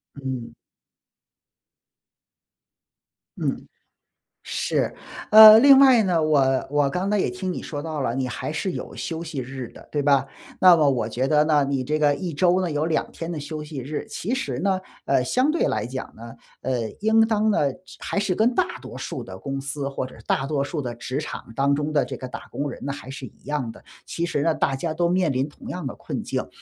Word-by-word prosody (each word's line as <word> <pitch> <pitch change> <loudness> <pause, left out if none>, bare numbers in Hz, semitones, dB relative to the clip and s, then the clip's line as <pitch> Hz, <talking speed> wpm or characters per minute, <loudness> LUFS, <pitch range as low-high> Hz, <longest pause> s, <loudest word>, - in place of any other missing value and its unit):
嗯。 130 -4 -5 2.9
嗯， - - -2 0.8
是。 - - -1 0.4
呃， 215 0 +11
另 275 +2 +8
外 260 -5 +7
呢， 175 -4 +1
我 135 -4 +2
我 145 -1 +2
刚 185 +6 -1
才 210 - +2
也 195 - +1
听 185 0 -4
你 - - -5
说 145 -3 -5
到 155 -2 -4
了， 125 -3 -1
你 130 0 -1
还 125 - -4
是 185 +3 -2
有 - - -7
休 165 0 -4
息 160 -4 -5
日 130 0 -6
的， - - -15
对 150 - -1
吧？ 140 -1 +3 0.3
那 185 -2 +8
么 150 -2 +3
我 125 -5 +1
觉 125 +4 -1
得 150 0 +4
呢， 150 -2 +3
你 135 -2 -1
这 150 +4 -1
个 150 -1 +3
1 170 +3 -4
周 180 +4 +3
呢， 180 -3 -2
有 150 +1 0
2 160 -1 -1
天 165 +1 -6
的 160 - -4
休 150 +1 -6
息 150 -2 -7
日。 145 +4 -5
其 225 +8 -3
实 130 - -3
呢， 190 +1 +1 0.3
呃， 135 -2 +2
相 255 - +1
对 325 +2 +1
来 - - -1
讲 130 +1 -6
呢， 115 +1 -10 0.3
呃， 120 -4 -2
应 220 +2 +3
当 220 -1 +1
呢 145 -10 +1
就 - - -18 0.2
还 - - -2
是 195 -3 0
跟 225 +5 +2
大 - - 0
多 - - -10
数 - - -5
的 95 0 -10
公 135 +7 -4
司、 140 0 -4
或 135 - -3
者 130 - -11
是 - - -15
大 135 - +1
多 140 -1 -1
数 145 +3 -4
的 125 -4 -4
职 130 +3 -4
场 155 - -6
当 140 +2 +2
中 150 +1 -1
的 145 -2 +2
这 - - -6
个 130 - -7
打 125 - -7
工 145 +1 -3
人 135 - -8
呢， 140 - -2
还 140 - -10
是 135 0 -7
一 - - -16
样 145 -5 -2
的。 - - -16 0.2
其 170 - -4
实 160 -4 -1
呢， 165 - +2
大 135 - 0
家 155 +4 -3
都 170 +1 +1
面 180 -3 +2
临 135 +2 -1
同 - - -13
样 175 -6 -4
的 - - -6
困 - - -5
境， - - -3
150 Hz, 230 characters per minute, -24 LUFS, 135-175 Hz, 2.9 s, 呃